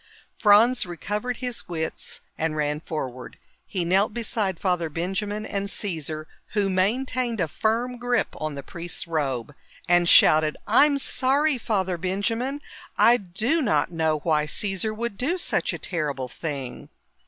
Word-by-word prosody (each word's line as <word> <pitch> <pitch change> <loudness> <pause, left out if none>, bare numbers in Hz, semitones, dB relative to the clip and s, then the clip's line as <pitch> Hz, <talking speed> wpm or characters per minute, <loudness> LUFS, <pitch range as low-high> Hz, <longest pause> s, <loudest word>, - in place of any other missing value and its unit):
Franz 230 +4 +5
recovered 210 +7 -3
his 250 -2 -4
wits 160 -2 -4
and 160 -1 -1
ran 150 0 0
forward. 130 -6 -6 0.3
He 180 -3 -2
knelt 195 +4 +2
beside 215 -6 -1
Father 180 -4 0
Benjamin 195 +6 -3
and 200 -1 -3
Caesar, 160 -6 -4 0.3
who 200 -2 +1
maintained 235 +4 0
a 170 - +1
firm 230 +9 -1
grip 245 0 +1
on 155 -1 -3
the 140 - -6
priest's 170 +4 -5
robe, 145 -6 -2 0.3
and 175 0 +4
shouted, 155 0 +6
"I'm 280 +7 +5
sorry, 275 +1 +2
Father 190 -6 -1
Benjamin! 225 - -1 0.4
I 240 +1 +6
do 220 - 0
not 210 - +1
know 160 -2 +1
why 155 -2 +2
Caesar 195 +5 0
would 220 -1 -4
do 325 +9 +1
such 360 - 0
a - - -4
terrible 145 -7 -3
thing!" 140 -3 -6
195 Hz, 140 wpm, -25 LUFS, 160-230 Hz, 0.4 s, shouted